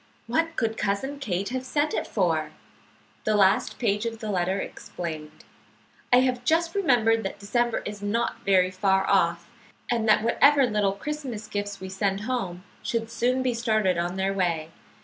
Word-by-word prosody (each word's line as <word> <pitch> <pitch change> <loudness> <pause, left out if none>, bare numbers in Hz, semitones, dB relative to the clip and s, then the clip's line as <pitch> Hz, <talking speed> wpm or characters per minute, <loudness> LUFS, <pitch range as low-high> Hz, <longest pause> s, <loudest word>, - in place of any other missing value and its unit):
What 325 +8 0
could 225 -1 -1
Cousin 210 +8 -2
Kate 200 -7 -2
have 255 +1 -3
sent 290 +3 0
it - - -2
for?" 165 -6 0 0.7
The 215 - +1
last 195 -2 +3
page 210 -1 0
of 225 -1 -4
the 215 -1 -4
letter 185 0 0
explained. 155 -5 -7 0.7
"I 245 +1 +7
have 250 -1 0
just 330 +5 +2
remembered 240 - +3
that 195 -1 -5
December 235 +4 0
is 205 -1 -6
not 220 +4 -1
very 185 -2 +3
far 190 0 +1
off, 170 -2 +2 0.4
and 225 -2 +1
that 215 - +5
whatever 275 +4 +5
little 210 -4 +1
Christmas 255 -1 -5
gifts 205 -1 -4
we 190 - -6
send 195 +1 -1
home 205 -7 -3 0.2
should 230 -1 -2
soon 250 +3 +1
be 250 -1 +1
started 215 -6 +1
on 175 +1 -2
their 190 +1 0
way. 170 -4 -1
210 Hz, 170 wpm, -26 LUFS, 190-245 Hz, 0.7 s, I